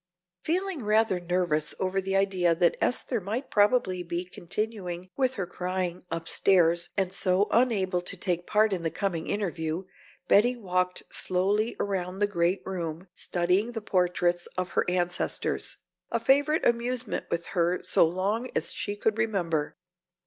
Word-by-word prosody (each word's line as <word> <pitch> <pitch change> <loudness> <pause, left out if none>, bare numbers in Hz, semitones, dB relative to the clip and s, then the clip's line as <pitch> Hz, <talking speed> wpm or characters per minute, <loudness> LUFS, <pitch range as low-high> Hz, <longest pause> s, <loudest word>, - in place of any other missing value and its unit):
Feeling 360 -3 -1
rather 215 -2 +2
nervous 175 -4 0
over 190 +1 0
the 195 +1 -2
idea 185 -3 +2
that 170 0 +3
Esther 245 -2 0
might 220 +8 -4
probably 205 -3 +3
be 175 +1 -3
continuing 185 -1 -4
with 260 -1 +1
her 195 - -2
crying 180 0 -3
upstairs 170 0 +2
and 190 -1 0
so 190 +1 +2
unable 205 -7 +2
to 185 +2 -4
take 175 -2 -2
part 215 0 +3
in 180 - -2
the 165 - 0
coming 175 -3 -2
interview, 175 -4 -2 0.4
Betty 240 +5 +5
walked 180 -4 -1
slowly 200 +5 0
around 190 -2 -2
the 205 - +3
great 180 -1 0
room 175 -1 -5
studying 180 +8 0
the 225 - -4
portraits 175 -3 +1
of 185 -1 -2
her - - +1
ancestors, 180 0 -1 0.3
a - - 0
favorite 285 +3 +3
amusement 240 0 0
with 170 0 -2
her 175 0 +1
so 185 - +4
long 200 +8 -1
as - - 0
she 205 - -3
could 215 +1 0
remember. 175 -9 -1
185 Hz, 150 wpm, -28 LUFS, 175-215 Hz, 0.4 s, Betty